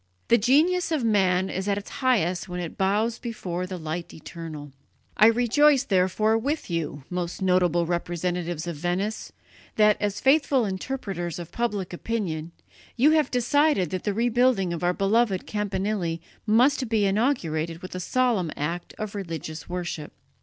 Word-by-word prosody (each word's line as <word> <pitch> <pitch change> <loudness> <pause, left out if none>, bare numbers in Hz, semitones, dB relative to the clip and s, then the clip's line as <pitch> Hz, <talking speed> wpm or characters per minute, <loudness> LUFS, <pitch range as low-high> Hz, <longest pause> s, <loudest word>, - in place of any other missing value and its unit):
The 235 - +6
genius 320 - +3
of 305 -6 0
man 190 -4 +2
is 190 +1 -4
at 200 -1 +1
its 205 - -7
highest 190 -10 +1
when 180 0 -4
it 175 -2 -5
bows 210 +4 +1
before 185 -6 -4
the 185 0 -5
Light 165 +1 -5
Eternal. 155 -2 -8 0.4
I 215 - +7
rejoice, 250 +4 +4
therefore, 215 +1 +2
with 285 - -3
you, 155 -4 -3
most 180 -1 -3
noble 180 -3 +2
representatives 175 -1 -2
of 170 -3 -5
Venice, 180 +7 -2 0.4
that, 210 -1 +5
as 205 -1 -1
faithful 275 -3 +3
interpreters 190 - -4
of 175 -1 -8
public 210 -7 -2
opinion, 175 -6 -3 0.4
you 275 +6 +5
have 310 -1 +3
decided 250 - +2
that 185 - -3
the 205 - 0
rebuilding 235 -5 +2
of 170 - -5
our 175 - +3
beloved 200 0 +1
campanile 200 -4 -2 0.3
must 255 +3 +3
be 220 -3 +2
inaugurated 170 - 0
with 185 - -7
a 185 - -4
solemn 225 -2 +1
act 170 +4 -4
of 215 -2 -5
religious 165 -5 -6
worship. 175 -4 -4
195 Hz, 155 wpm, -25 LUFS, 175-230 Hz, 0.4 s, I